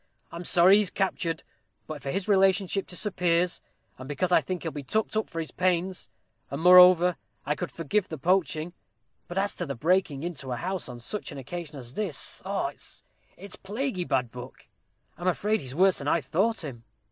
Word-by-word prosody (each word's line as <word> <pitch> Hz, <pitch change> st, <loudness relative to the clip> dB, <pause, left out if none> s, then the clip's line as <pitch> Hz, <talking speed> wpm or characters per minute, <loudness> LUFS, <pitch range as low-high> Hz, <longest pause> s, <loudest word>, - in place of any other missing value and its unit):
I'm 170 Hz, +1 st, -7 dB
sorry 180 Hz, +4 st, +6 dB
he's 205 Hz, -3 st, +1 dB
captured, 180 Hz, -4 st, -2 dB, 0.4 s
for 155 Hz, -1 st, -6 dB
his 195 Hz, +6 st, -2 dB
relationship 195 Hz, -1 st, +2 dB
to 180 Hz, -, -8 dB
Sir 210 Hz, +3 st, -3 dB
Piers, 175 Hz, -1 st, +1 dB, 0.4 s
and 130 Hz, +1 st, -9 dB
because 180 Hz, +5 st, -1 dB
I -, -, +6 dB
think 185 Hz, -2 st, -4 dB
he'll 165 Hz, -, -2 dB
be 145 Hz, -, -6 dB
tucked 215 Hz, +12 st, -1 dB
up 220 Hz, -, 0 dB
for 165 Hz, -, -9 dB
his 160 Hz, -1 st, -3 dB
pains; 180 Hz, 0 st, -1 dB, 0.4 s
and, 140 Hz, -, -4 dB
moreover, 180 Hz, 0 st, +7 dB, 0.3 s
I 145 Hz, -, +1 dB
could 175 Hz, +2 st, -4 dB
forgive 170 Hz, +8 st, -1 dB
the 160 Hz, -, -5 dB
poaching; 170 Hz, +1 st, 0 dB, 0.5 s
but 175 Hz, -, -6 dB
as 200 Hz, +1 st, 0 dB
to -, -, -3 dB
the 140 Hz, -, -3 dB
breaking 160 Hz, 0 st, +1 dB
into 140 Hz, -7 st, -4 dB
a 120 Hz, -, -2 dB
house 185 Hz, -2 st, -3 dB
on 120 Hz, -1 st, -8 dB
such 205 Hz, -, -5 dB
an 145 Hz, -, -8 dB
occasion 155 Hz, +2 st, -7 dB
as 125 Hz, -2 st, -10 dB
this, 190 Hz, -7 st, -5 dB
och! -, -, -2 dB, 0.6 s
It's 195 Hz, +1 st, -10 dB
a -, -, -20 dB
plaguy 205 Hz, -1 st, -2 dB
bad 125 Hz, -7 st, 0 dB
look. 125 Hz, +1 st, -10 dB, 0.5 s
I'm 175 Hz, -, -3 dB
afraid 210 Hz, +4 st, +1 dB
he's 130 Hz, 0 st, -8 dB
worse 190 Hz, +2 st, +4 dB
than 140 Hz, -, -5 dB
I 170 Hz, -, +3 dB
thought 190 Hz, -, 0 dB
him." 125 Hz, -6 st, -7 dB
175 Hz, 195 wpm, -27 LUFS, 150-190 Hz, 0.6 s, moreover